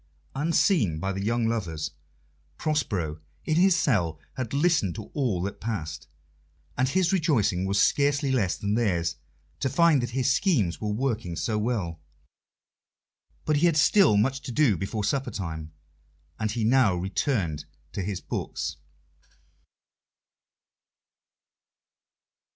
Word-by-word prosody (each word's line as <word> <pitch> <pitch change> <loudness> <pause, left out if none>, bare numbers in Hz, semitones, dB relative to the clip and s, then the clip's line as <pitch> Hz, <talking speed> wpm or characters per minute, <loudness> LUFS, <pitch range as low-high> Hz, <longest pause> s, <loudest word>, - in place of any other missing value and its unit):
Unseen 145 - +2
by 95 +4 -2
the 95 0 -3
young 115 +2 +1
lovers, 85 -9 -2 0.7
Prospero, 95 - -1 0.2
in 155 - +1
his 185 0 +5
cell, 100 - +1
had 130 -4 -4
listened 145 - +2
to 110 - -8
all 120 - 0
that 100 - -5
passed, 80 -10 -4 0.7
and 130 +1 +1
his 185 +4 +2
rejoicing 125 - +2
was 100 +1 +1
scarcely 140 +3 +2
less 105 -9 +1
than 100 0 -2
theirs 90 -9 0 0.4
to 135 - 0
find 165 -2 +4
that 120 - -2
his 130 +1 +1
schemes 135 - +1
were 105 - -2
working 110 -6 -2
so 110 +6 -1
well. 105 -8 -2 1.5
But 155 -1 +2
he 170 +4 +4
had 165 -3 +2
still 155 - +5
much 130 +5 +1
to - - -6
do 125 -5 +3
before 100 +5 -3
supper 135 +5 0
time, 80 -4 -5 0.7
and 110 -1 0
he 110 +1 -2
now 115 -4 +4
returned 90 - -1 0.3
to - - -4
his 95 0 -3
books. - - -4
110 Hz, 130 wpm, -26 LUFS, 95-140 Hz, 1.5 s, his